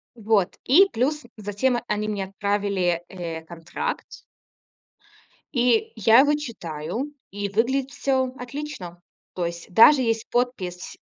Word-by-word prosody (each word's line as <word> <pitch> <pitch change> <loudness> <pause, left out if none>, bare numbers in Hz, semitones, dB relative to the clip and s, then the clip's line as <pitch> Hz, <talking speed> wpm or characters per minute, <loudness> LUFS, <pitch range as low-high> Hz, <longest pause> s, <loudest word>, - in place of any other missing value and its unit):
Вот. 215 -4 +1
И 365 +10 +6
плюс 280 +6 0
затем 210 +5 0
они 210 0 -1
мне 200 -2 -2
отправили, 195 -3 -1
э, 170 -4 -6
контракт. 165 0 -5 1.3
И 345 - +2
я 230 +2 +6
его 290 +2 +5
читаю 230 - -5 0.2
и 200 0 -4
выглядит 255 +6 0
всё 265 -2 0
отлично. 250 - -7 0.3
То 175 -2 -1
есть 170 +1 -6
даже 265 +6 +8
есть 225 -2 -1
подпись 210 -8 -2
220 Hz, 120 wpm, -24 LUFS, 185-260 Hz, 1.3 s, даже